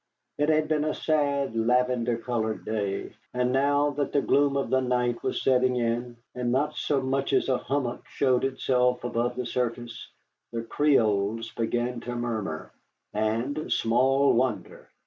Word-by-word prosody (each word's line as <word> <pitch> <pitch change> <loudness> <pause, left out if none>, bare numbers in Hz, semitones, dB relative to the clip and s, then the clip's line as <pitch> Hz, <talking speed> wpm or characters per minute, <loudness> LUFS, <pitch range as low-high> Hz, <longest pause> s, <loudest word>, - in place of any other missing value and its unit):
It 150 +1 +2
had 155 0 +3
been 155 -1 +1
a 155 - -1
sad, 140 -5 0
lavender 120 0 +1
colored 110 -4 -3
day, 100 -3 -3 0.2
and 125 0 +1
now 145 +2 +2
that 145 0 -2
the 140 - +2
gloom 140 0 +3
of 140 - -2
the 130 0 +3
night 125 -1 0
was - - -2
setting 130 -1 +3
in, 120 0 -1 0.2
and 125 -1 -2
not 150 +4 0
so 140 -3 0
much 135 +1 -1
as - - +2
a 130 - +2
hummock 135 -3 -3
showed 130 -3 +1
itself 125 -2 +1
above 120 0 -1
the 125 0 -3
surface, 120 -1 -3 0.4
the 115 -1 -3
Creoles 115 -5 +1
began 120 +2 -2
to 120 +1 -5
murmur. 110 -10 -3 0.4
And 115 +8 -1
small 130 +4 +3
wonder! 125 -1 -2
125 Hz, 155 wpm, -27 LUFS, 115-135 Hz, 0.4 s, had